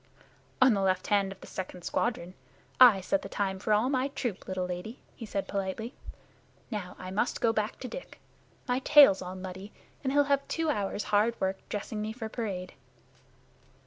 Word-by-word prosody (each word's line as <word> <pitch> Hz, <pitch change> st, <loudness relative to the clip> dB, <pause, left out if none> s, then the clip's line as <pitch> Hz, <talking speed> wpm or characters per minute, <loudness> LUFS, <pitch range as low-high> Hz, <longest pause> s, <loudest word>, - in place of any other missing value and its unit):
"On 255 Hz, -2 st, +6 dB
the 200 Hz, -, 0 dB
left 190 Hz, -1 st, +1 dB
hand 200 Hz, -1 st, +2 dB
of 195 Hz, -, -11 dB
the -, -, -10 dB
second 180 Hz, -1 st, -7 dB
squadron. 185 Hz, -6 st, -1 dB, 0.5 s
I 235 Hz, -7 st, +8 dB
set 295 Hz, +10 st, 0 dB
the -, -, -8 dB
time 190 Hz, -2 st, -2 dB
for 210 Hz, -, -2 dB
all 210 Hz, +4 st, +4 dB
my 265 Hz, 0 st, +1 dB
troop, 245 Hz, -7 st, -4 dB
little 185 Hz, -1 st, -2 dB
lady," 180 Hz, +6 st, -5 dB, 0.2 s
he 225 Hz, -, -8 dB
said 195 Hz, -1 st, -3 dB
politely. 200 Hz, +4 st, -3 dB, 0.8 s
"Now 200 Hz, -5 st, -4 dB
I 185 Hz, 0 st, -7 dB
must 215 Hz, +6 st, 0 dB
go 225 Hz, -1 st, +2 dB
back 215 Hz, 0 st, -1 dB
to -, -, -4 dB
Dick. -, -, -9 dB, 0.5 s
My 250 Hz, 0 st, +1 dB
tail's 275 Hz, -8 st, +7 dB
all 180 Hz, 0 st, -6 dB
muddy, 190 Hz, +2 st, -8 dB, 0.3 s
and 265 Hz, -, 0 dB
he'll 290 Hz, +1 st, +5 dB
have 280 Hz, -1 st, +1 dB
two 325 Hz, -2 st, 0 dB
hours' 205 Hz, -4 st, -2 dB
hard 220 Hz, +3 st, +3 dB
work 190 Hz, 0 st, -1 dB
dressing 210 Hz, +1 st, -4 dB
me 215 Hz, +1 st, -3 dB
for 225 Hz, -2 st, -6 dB
parade." 195 Hz, -6 st, -4 dB
210 Hz, 185 wpm, -29 LUFS, 190-245 Hz, 0.8 s, I